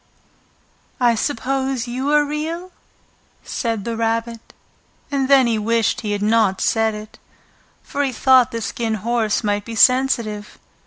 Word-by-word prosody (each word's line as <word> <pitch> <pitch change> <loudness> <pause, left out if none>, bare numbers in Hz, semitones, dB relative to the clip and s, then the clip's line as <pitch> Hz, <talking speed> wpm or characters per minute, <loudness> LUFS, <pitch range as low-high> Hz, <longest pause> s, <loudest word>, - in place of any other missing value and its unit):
"I 240 -2 +4
suppose 265 +1 -2
you 260 +4 -2
are 295 0 +4
real?" 320 +5 -4 0.7
said 225 -5 -3
the 230 -1 -3
Rabbit. 230 0 -3 0.6
And 275 -2 0
then 270 -2 +6
he 230 -2 0
wished 230 +1 0
he 210 - -3
had 205 0 -2
not 215 -3 +2
said 225 -1 +1
it, 210 0 -11 0.6
for 285 - -2
he 270 - -1
thought 255 0 +4
the 230 - -5
Skin 225 +1 -2
Horse 225 +1 -1
might 205 -1 0
be 230 +1 -7
sensitive. 235 -5 +2
230 Hz, 145 wpm, -20 LUFS, 220-265 Hz, 0.7 s, then